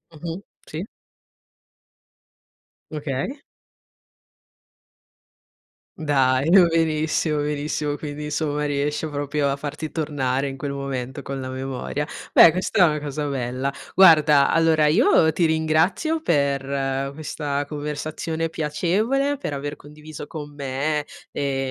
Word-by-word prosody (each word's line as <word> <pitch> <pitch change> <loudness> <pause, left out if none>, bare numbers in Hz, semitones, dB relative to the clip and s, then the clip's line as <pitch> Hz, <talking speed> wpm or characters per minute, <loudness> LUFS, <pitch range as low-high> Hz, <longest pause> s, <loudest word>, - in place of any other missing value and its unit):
Mh-mh, 165 +4 -6 0.3
sì. 160 +4 -5 2.1
Okay. 150 - -3 2.6
Dai 135 -2 +2
no, 185 0 +7
benissimo, 155 -1 +1
benissimo 145 0 -2
quindi 150 0 -6
insomma 150 -1 -1
riesce 145 +2 -1
proprio 145 0 -1
a 140 - -1
farti 150 +2 -5
tornare, 140 -4 -1
in 135 - -5
quel 140 +1 -4
momento, 135 -1 -4
con 135 0 -5
la 130 - -5
memoria. 135 +2 -4 0.2
Beh 165 - +8
questa 185 +2 +2
è - - +5
una 150 -1 0
cosa 145 0 -3
bella. 130 0 -2 0.2
Guarda 155 -6 +6
allora, 160 -2 +3
io 175 - +4
ti 170 - +2
ringrazio 160 - +1
per 140 - 0
questa 145 -1 -3
conversazione 155 +2 -3
piacevole, 210 - 0
per 260 - -4
aver 145 +1 -4
condiviso 150 +1 -10
con 145 -1 -8
me 145 +2 -2 0.3
le 140 -1 -2
150 Hz, 115 wpm, -23 LUFS, 140-160 Hz, 2.6 s, Beh